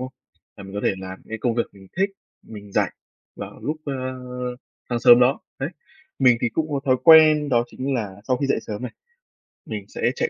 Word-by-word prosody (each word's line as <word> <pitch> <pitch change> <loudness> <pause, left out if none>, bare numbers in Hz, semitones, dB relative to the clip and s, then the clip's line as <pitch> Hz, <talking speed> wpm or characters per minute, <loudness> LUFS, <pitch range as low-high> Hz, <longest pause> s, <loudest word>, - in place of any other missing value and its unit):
không? 130 +1 -6 0.4
Là 100 - -10
mình 95 +1 -10
có 105 - -2
thể - - +2
làm 95 0 -7
những - - -24
cái 110 - -5
công 115 +1 0
việc 120 - +2
mình 95 -1 -16
thích, 195 +1 +2 0.3
mình 105 -2 -11
rảnh - - +2 0.5
vào - - -8
lúc, 150 +2 -2
ơ, 140 - -3 1.0
sáng 120 -1 -1
sớm 120 +1 +8
đó, 130 +3 +3 0.2
đấy, 135 +3 -2 0.5
mình 125 -3 +5
thì 120 - +1
cũng 155 +6 -2
có 140 - -1
thói 130 -1 +3
quen 155 -2 +8
đó 120 -2 +3
chính 135 +3 -3
là 105 -6 -3
sau 130 - +3
khi 140 +2 -1
dậy - - +1
sớm 105 +3 -5
này, 125 - -5 0.7
mình - - -6
sẽ - - -1
chạy 475 - 0
125 Hz, 220 wpm, -23 LUFS, 110-140 Hz, 1.0 s, sớm